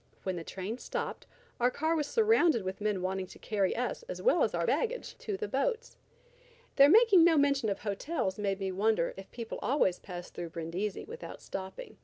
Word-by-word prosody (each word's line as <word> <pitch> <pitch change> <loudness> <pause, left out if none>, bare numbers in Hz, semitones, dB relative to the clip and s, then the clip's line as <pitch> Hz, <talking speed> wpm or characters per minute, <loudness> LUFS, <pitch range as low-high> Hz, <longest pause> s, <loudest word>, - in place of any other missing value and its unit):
When 190 -1 -2
the 170 - -5
train 195 +8 -5
stopped, - - -4 0.3
our 245 +1 +4
car 315 +5 0
was 300 -2 0
surrounded 385 - +3
with 190 +2 -5
men 205 -3 0
wanting 190 0 -2
to - - -13
carry 200 -3 0
us 250 - -2
as - - -5
well - - +3
as - - +2
our - - 0
baggage 485 +1 -1
to 410 -3 -3
the 430 - -3
boats. 485 +1 -1 0.8
Their 280 0 +8
making 415 -2 +7
no 330 -2 +5
mention 280 -5 +3
of 195 - -3
hotels 210 - -2
led 200 -1 -1
me 195 -1 -2
to 185 - -5
wonder 205 -3 +1
if 195 0 -10
people 230 -2 -6
always 245 -10 +2
passed 175 -2 -8
through 170 - -5
Brindisi 170 +5 -4
without 475 +2 -8
stopping. 190 - -7
220 Hz, 200 wpm, -31 LUFS, -, 0.8 s, Their